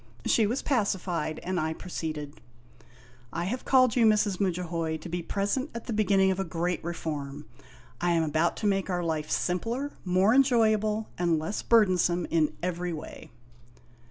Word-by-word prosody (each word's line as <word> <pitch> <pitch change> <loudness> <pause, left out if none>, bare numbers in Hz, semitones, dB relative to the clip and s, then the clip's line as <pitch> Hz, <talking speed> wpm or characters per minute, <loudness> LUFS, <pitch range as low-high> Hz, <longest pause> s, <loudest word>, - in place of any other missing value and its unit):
She 220 -3 +3
was 245 +6 -2
pacified, 180 - -1
and 185 0 -1
I 160 0 -1
proceeded: 155 -5 -6 0.5
" 120 0 -25
I 170 - -3
have 245 +7 -3
called 255 -3 +4
you, 240 - +4
Mrs. 210 -3 +3
Mudjahoy, 170 -4 -1
to 160 - -9
be 175 +1 -3
present 205 - -1
at 235 - -6
the 235 - -3
beginning 195 -2 +3
of 190 - -2
a - - +1
Great 175 0 -2
Reform. 150 -4 -5 0.6
I 175 0 +2
am 165 -1 +2
about 160 +2 +1
to - - -4
make 195 -1 +1
our 175 -1 -1
life 155 -2 -2
simpler, 230 +10 -1
more 185 +4 +3
enjoyable, 220 -5 +3
and 170 -2 +2
less 160 +7 -3
burdensome 180 -6 +3
in 160 -2 +2
every 180 -1 -2
way." 155 - -9
180 Hz, 165 wpm, -28 LUFS, 165-215 Hz, 0.6 s, called